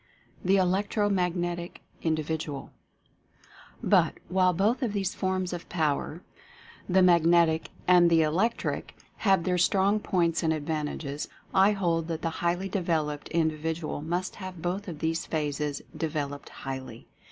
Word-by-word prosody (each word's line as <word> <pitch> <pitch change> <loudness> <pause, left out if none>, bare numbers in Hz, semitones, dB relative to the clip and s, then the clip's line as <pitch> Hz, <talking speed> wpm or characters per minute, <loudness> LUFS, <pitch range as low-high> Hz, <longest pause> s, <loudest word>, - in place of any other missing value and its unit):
THE 190 +2 +4
ELECTRO 200 +3 +1
MAGNETIC 175 -2 -1 0.2
INDIVIDUAL. 155 -2 -2 1.1
But, - - +4
while 185 0 +4
both 205 - +1
of 235 -5 -1
these 195 -2 -1
forms 185 -1 -1
of 175 - -7
Power, 155 +1 -1 0.7
the 185 +1 +5
"Mag 175 -2 +6
netic" 165 -1 +4 0.2
and 175 -1 +6
the 165 -1 +5
"Electric," 185 +10 -1 0.2
have 195 -5 +3
their 180 0 +1
strong 195 +3 +3
points 170 -5 +1
and 160 - +1
advantages, 150 -1 -3 0.3
I 195 +2 +5
hold 170 -4 0
that 165 -1 -4
the 165 - 0
highly 175 +3 0
developed 160 -6 -1
In 165 -1 +2
dividual 155 0 -3
must 175 +4 -3
have 185 -3 -7
both 180 +5 -3
of 170 -4 -5
these 165 0 -1
phases 150 -2 -2
developed 145 -3 -3
highly. 130 -3 -7
170 Hz, 140 wpm, -28 LUFS, 155-185 Hz, 1.1 s, Mag